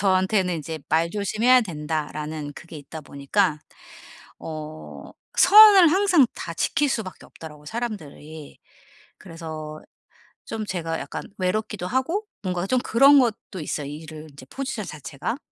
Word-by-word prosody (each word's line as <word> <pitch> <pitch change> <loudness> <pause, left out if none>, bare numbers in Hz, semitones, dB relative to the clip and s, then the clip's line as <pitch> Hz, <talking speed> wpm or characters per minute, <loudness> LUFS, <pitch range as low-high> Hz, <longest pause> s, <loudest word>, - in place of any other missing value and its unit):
저한테는 190 -1 +2
인제 160 +1 -6
"말조심해야 210 +9 +2
된다."라는 150 -3 -4
그게 170 -2 -11
있다 150 +2 -9
보니까 150 +4 0 0.8
어 155 0 -8 0.3
선을 405 -5 +9
항상 375 -8 +4
다 - - -6
지킬 290 - +1
수밖에 200 -7 -5
없더라고요, 150 -2 -12
사람들이. 160 -9 -7 0.6
그래서 155 -3 -8 0.6
좀 220 -1 -5
제가 165 -4 -3
약간 - - -6
외롭기도 190 0 -2
하고 325 - -1 0.2
뭔가 180 0 -2
좀 255 +2 +2
그런 275 +4 +6
것도 220 -6 -1
있어요, 150 -1 -4
일을 155 +1 -9
이제 130 -2 -13
포지션 265 -7 -4
자체가. 145 - -5
180 Hz, 295 characters per minute, -24 LUFS, 155-225 Hz, 0.8 s, 선을